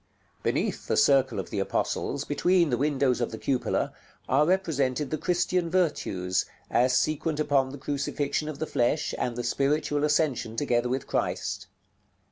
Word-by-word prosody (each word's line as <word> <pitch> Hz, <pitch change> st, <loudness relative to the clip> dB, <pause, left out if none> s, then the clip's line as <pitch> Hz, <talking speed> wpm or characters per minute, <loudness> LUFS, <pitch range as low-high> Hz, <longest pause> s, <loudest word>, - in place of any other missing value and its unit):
§ -, -, -41 dB
LXIX. -, -, -39 dB
Beneath -, -, -1 dB
the -, -, +1 dB
circle 135 Hz, +1 st, +4 dB
of -, -, -6 dB
the 105 Hz, -, -2 dB
apostles, 135 Hz, +7 st, -1 dB
between 170 Hz, +1 st, +2 dB
the 120 Hz, -, +2 dB
windows 135 Hz, -3 st, +1 dB
of 120 Hz, -, 0 dB
the 110 Hz, -, -6 dB
cupola, 130 Hz, +1 st, -1 dB, 0.3 s
are 150 Hz, +3 st, +3 dB
represented 150 Hz, -7 st, 0 dB
the 155 Hz, -, 0 dB
Christian 180 Hz, 0 st, 0 dB
virtues, 100 Hz, -, 0 dB, 0.2 s
as 125 Hz, +2 st, +3 dB
sequent 155 Hz, 0 st, 0 dB
upon 140 Hz, -3 st, +2 dB
the 140 Hz, -, -8 dB
crucifixion 145 Hz, +2 st, -2 dB
of 150 Hz, -, -6 dB
the 155 Hz, -, -2 dB
flesh, 145 Hz, +2 st, 0 dB
and 120 Hz, -, -1 dB
the 120 Hz, -, -3 dB
spiritual 145 Hz, +4 st, 0 dB
ascension 145 Hz, -7 st, +1 dB
together 120 Hz, -2 st, +1 dB
with 130 Hz, +1 st, -2 dB
Christ. -, -, -2 dB
140 Hz, 165 wpm, -27 LUFS, 125-155 Hz, 0.3 s, circle